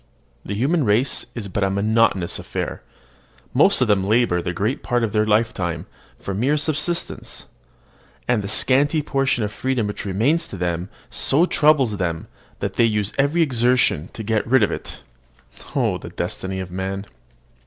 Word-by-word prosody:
The 100 - -4
human 145 +9 +1
race 120 +4 +2
is 115 -4 -5
but 100 +1 -2
a 95 - +2
monotonous 100 -2 +1
affair. - - -4 0.7
Most - - +4
of 125 - +3
them 100 -2 +2
labour 105 -3 +2
the 85 - -3
greater 105 - -1
part 120 -1 -1
of 110 - 0
their 105 0 +2 0.2
time 90 -7 -4 0.3
for 100 - -5
mere 130 +10 +1
subsistence; 155 +3 -2 0.8
and 120 -3 +2
the 100 - -5
scanty 135 +8 +3
portion 135 -5 0
of 105 - -2
freedom 130 -3 -1
which 105 - -4
remains 120 - +1
to 95 - -8
them 90 +1 -2 0.2
so 155 +6 +3
troubles 145 - +3
them 85 -4 -2 0.4
that - - -3
they - - +5
use 105 -2 0
every 150 +5 +3
exertion 125 - +2
to 110 - -6
get 110 +1 0
rid 130 -1 +4
of - - +1
it. - - -6 0.7
Oh, - - +1
the - - -9
destiny 95 0 -4
of 95 -1 -6
man! 95 +2 -4
110 Hz, 165 wpm, -21 LUFS, 95-130 Hz, 0.8 s, they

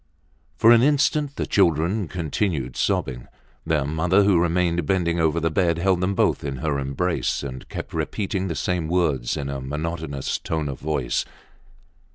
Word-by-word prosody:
For 115 +8 +6
an 115 -1 +7
instant 145 +1 +2
the - - -2
children 85 +2 +2
continued 80 - -2
sobbing. - - -1 0.4
Their 75 -4 +1
mother, 85 +7 +2
who 100 -4 +4
remained 85 -2 +1
bending 85 -2 +1
over 80 0 +2
the 80 0 0
bed, 85 -1 +1
held 90 +1 +1
them 95 +2 0
both - - +1
in 70 -2 -3
her 70 +2 -1
embrace, 70 +7 -1
and 65 -2 -7
kept - - -6
repeating 95 -2 -2
the 85 - -3
same 90 -2 -1
words 80 -8 0
in 70 -2 -3
a 70 -1 -4
monotonous 75 0 -3
tone 80 -3 -2
of 70 - -6
voice. 75 -6 -1
85 Hz, 165 wpm, -23 LUFS, 70-90 Hz, 0.4 s, an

